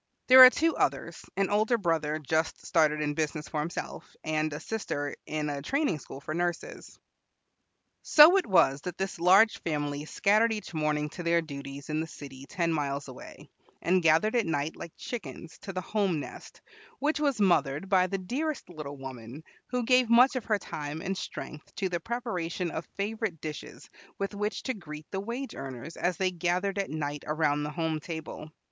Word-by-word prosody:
There 260 0 +12
are 255 - +12
two 325 +5 +1
others, - - -1
an 195 0 +1
older 215 +3 +3
brother 165 -6 0
just 155 +2 -1
started 155 -2 +2
in 150 -1 0
business 155 0 -2
for 155 - -3
himself, 160 +4 -5
and 155 0 0
a 150 - -5
sister 150 -8 -3
in 155 -1 -2
a 145 -1 -3
training 270 - 0
school 135 - -10
for 155 +2 -5
nurses. 175 0 -4 1.0
So 315 +5 +8
it 385 - 0
was 165 -8 +4
that 180 +1 -6
this 190 -2 -3
large 195 +6 +5
family 145 -2 -2
scattered 215 +7 +3
each 210 -4 -6
morning 150 -1 0
to 175 - -8
their 170 0 +2
duties 140 -1 -8
in 155 - 0
the 160 - -2
city 140 -3 -10
ten 170 -2 0
miles 140 -2 -2
away, 130 - -11 0.3
and 180 +2 +2
gathered 165 +8 +3
at 230 -6 +2
night, 155 0 -1
like 170 - -8
chickens, 165 - -7
to 195 - -7
the 185 -1 -3
home 195 -4 0
nest, - - -10 0.4
which 300 +2 0
was 280 -6 +1
mothered 155 -4 +2
by 185 -2 +4
the 195 - -2
dearest 260 +10 -3
little 150 -4 -7
woman, 130 +1 -9 0.2
who 250 -1 -1
gave 250 -1 +4
much 250 +4 +6
of 255 - -3
her 215 -2 +2
time 150 -4 -6
and 195 - -2
strength 150 -4 -7
to 190 -2 -1
the 175 -1 -1
preparation 180 -6 -3
of 160 +2 -5
favorite 210 -3 -2
dishes 150 -1 -8 0.3
with 200 +1 -3
which 210 +1 -3
to 260 - -1
greet 155 -7 -9
the 190 - -2
wage 235 +7 -5
earners 135 +4 -7
as 175 -2 -1
they 185 -1 +1
gathered 180 +3 -1
at 195 - -2
night 145 -1 -4
around 150 -1 +1
the 150 - -2
home 160 0 -2
table. 160 -1 -7
170 Hz, 185 wpm, -29 LUFS, 150-205 Hz, 1.0 s, There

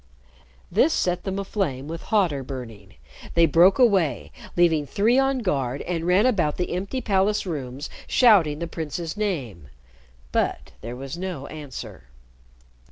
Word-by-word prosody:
This 265 - +3
set 180 - 0
them 190 0 -2
aflame 185 - -2
with 165 +1 -6
hotter 180 -10 +2
burning. 115 -7 -9 0.4
They 170 0 +6
broke 170 +5 +5
away, 195 - +2 0.3
leaving 165 -4 +3
three 230 - +2
on 270 -2 +1
guard, 135 -6 -1
and 170 -1 -3
ran 185 +5 +4
about 180 -12 +1
the 180 - -2
empty 195 +9 -3
palace 205 -1 +1
rooms 140 -5 -5 0.2
shouting 195 - +5
the 170 - -3
prince's 165 +1 -5
name. 135 - -3 0.6
But - - -1
there 120 +2 -6
was 135 +5 -7
no 180 -7 -5
answer. 145 - -9
170 Hz, 140 wpm, -24 LUFS, 140-195 Hz, 0.6 s, They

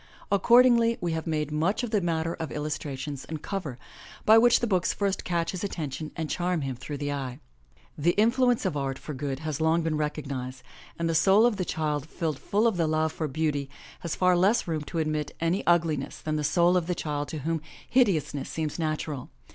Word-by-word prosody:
Accordingly, 235 +2 +5
we 175 -1 -1
have 160 0 -3
made 155 -2 -1
much 175 +10 0
of 240 - -3
the 210 -3 +2
matter 165 -1 -1
of 160 -2 -5
illustrations 145 -2 -4
and 160 -2 -7
cover, 170 -11 -4 0.5
by 220 - +8
which 240 +1 +5
the - - 0
books 185 -5 +1
first 200 -1 -1
catch 170 -2 -1
his 185 - -5
attention 155 -5 -4
and 160 -2 -3
charm 175 0 -1
him 135 -2 -3
through 145 +4 -6
the 145 0 -3
eye. 130 -3 -4 0.6
The 170 +4 +2
influence 240 +2 +3
of 180 -5 0
art 135 -2 -2
for 150 - -7
good 140 0 -4
has 155 -1 -3
long 160 +1 +3
been 160 -1 0
recognized, 135 -4 -4 0.3
and 170 - -1
the 165 - 0
soul 195 +7 +5
of 240 -4 +2
the 185 - -1
child 150 -3 -2
filled 155 -5 -3
full 210 +3 +1
of 225 -5 +2
the 165 -2 +2
love 155 0 +1
for 155 - -2
beauty 145 -1 -1 0.3
has 170 - -3
far 180 -1 +3
less 195 +6 +3
room 160 -2 -1
to 165 - -5
admit 155 -2 -1
any 165 +4 +1
ugli 170 -3 +3
ness 135 - -7
than 155 0 -2
the 150 - -1
soul 170 +5 +3
of 175 -2 +1
the 180 - 0
child 145 -2 -3
to 160 - -5
whom 160 +2 -1 0.3
hideousness 175 - +2
seems 155 0 -3
natural. 155 -4 -3
160 Hz, 210 wpm, -27 LUFS, 150-180 Hz, 0.6 s, by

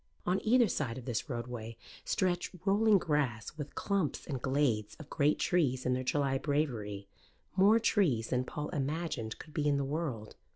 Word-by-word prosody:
On 180 +2 +1
either 240 +1 +5
side 130 - -2
of 125 - -8
this 120 +1 -2
roadway 120 -2 -5 0.3
stretched 180 0 0
rolling 210 +1 +5
grass 145 - -1
with 150 -2 -7
clumps 195 -7 -1
and 135 -5 -4
glades 125 -6 +1
of 155 -2 -12
great 150 0 +2
trees 135 -8 +1
in 125 - +2
their 130 0 -1
July 135 0 +1
bravery 115 -10 -2 0.5
more 200 +4 +6
trees 180 - +2
than 125 0 +1
Paul 150 +3 -5
imagined 145 -5 -3
could 155 - -12
be 150 -1 0
in 145 -1 +3
the 140 - 0
world. 135 -7 -3
145 Hz, 170 wpm, -32 LUFS, 125-170 Hz, 0.5 s, more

